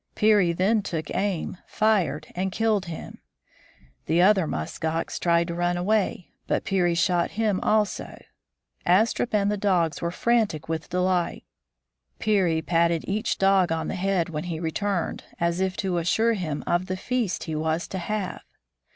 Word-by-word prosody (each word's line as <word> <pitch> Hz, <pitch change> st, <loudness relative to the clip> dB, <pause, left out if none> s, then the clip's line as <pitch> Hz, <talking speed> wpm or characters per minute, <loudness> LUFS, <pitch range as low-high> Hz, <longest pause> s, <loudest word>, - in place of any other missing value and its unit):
Peary 210 Hz, -5 st, +4 dB
then 195 Hz, +6 st, +2 dB
took 160 Hz, -6 st, -4 dB
aim, 190 Hz, -3 st, -1 dB
fired, 175 Hz, -9 st, +1 dB
and 190 Hz, +1 st, -2 dB
killed 215 Hz, -2 st, +1 dB
him. 165 Hz, -2 st, -8 dB, 0.9 s
The 160 Hz, +3 st, +2 dB
other 190 Hz, -2 st, +5 dB
musk 80 Hz, -, -5 dB
ox 160 Hz, +1 st, -2 dB
tried 170 Hz, -1 st, +2 dB
to -, -, -2 dB
run 175 Hz, +1 st, 0 dB
away, 190 Hz, -1 st, 0 dB, 0.2 s
but -, -, 0 dB
Peary 180 Hz, -3 st, +1 dB
shot 170 Hz, +1 st, +2 dB
him 215 Hz, -4 st, +1 dB
also. 215 Hz, -2 st, 0 dB, 0.6 s
Astrup 220 Hz, +6 st, +2 dB
and 205 Hz, 0 st, +2 dB
the 210 Hz, -, -1 dB
dogs 180 Hz, -5 st, +1 dB
were 170 Hz, -, 0 dB
frantic 215 Hz, -4 st, 0 dB
with 160 Hz, -1 st, -4 dB
delight. 180 Hz, -1 st, 0 dB, 0.7 s
Peary 180 Hz, -7 st, +1 dB
patted 170 Hz, 0 st, +1 dB
each 215 Hz, +4 st, -1 dB
dog 195 Hz, -3 st, +3 dB
on 160 Hz, 0 st, -1 dB
the -, -, -2 dB
head 185 Hz, -2 st, 0 dB
when 155 Hz, 0 st, -4 dB
he 165 Hz, -3 st, -4 dB
returned, 175 Hz, +2 st, -2 dB, 0.2 s
as 170 Hz, +1 st, 0 dB
if 190 Hz, 0 st, -1 dB
to 185 Hz, -3 st, 0 dB
assure 220 Hz, +7 st, +2 dB
him 160 Hz, -8 st, -3 dB
of 175 Hz, +2 st, 0 dB
the 185 Hz, 0 st, -3 dB
feast 240 Hz, -2 st, -1 dB
he 160 Hz, -, -4 dB
was 160 Hz, +2 st, -1 dB
to 190 Hz, -, -4 dB
have. 200 Hz, +1 st, -3 dB
180 Hz, 160 wpm, -25 LUFS, 170-205 Hz, 0.9 s, other